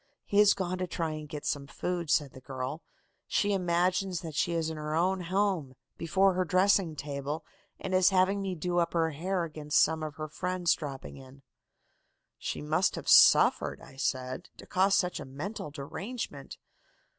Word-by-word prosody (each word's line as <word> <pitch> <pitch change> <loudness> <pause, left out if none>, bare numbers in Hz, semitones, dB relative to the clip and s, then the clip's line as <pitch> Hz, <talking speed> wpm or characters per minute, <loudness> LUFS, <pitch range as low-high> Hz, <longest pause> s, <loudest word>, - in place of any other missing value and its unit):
"'He 200 - +2
has 210 -1 +6
gone 185 -1 -3
to 185 - -2
try 165 -2 -2
to 150 - -9
get 150 -1 -7
some 140 -1 -2
food,' 175 +2 -3
said 145 -4 +2
the 130 - -12
girl. 130 +3 -5 0.5
'She 205 0 +1
imagines 180 0 +1
that 165 -3 -7
she 170 - 0
is 160 -1 -1
in - - -5
her 150 0 -3
own 185 +3 +1
home, 185 -7 0 0.2
before 190 +4 +2
her 185 +1 +1
dressing 185 -1 +3
table, 145 +2 -4 0.3
and 190 - -4
is 185 0 +5
having 195 +1 +2
me 190 -2 -3
do 175 +2 -1
up 170 -1 0
her 165 -1 +1
hair 180 +4 -2
against 150 -2 0
some 160 0 +3
of 155 -2 -5
her 155 +1 -5
friends 180 +2 0
dropping 140 -4 -7
in.' 135 +1 -14 1.0
"'She 75 - -4
must 75 - +1
have - - -7
suffered,' - - +6
I 130 - -14
said, 130 +4 -3
'to - - -11
cause 195 +1 +3
such 180 -2 0
a - - -5
mental 150 +7 -6
derangement. 185 - -6
170 Hz, 180 wpm, -29 LUFS, 150-185 Hz, 1.0 s, has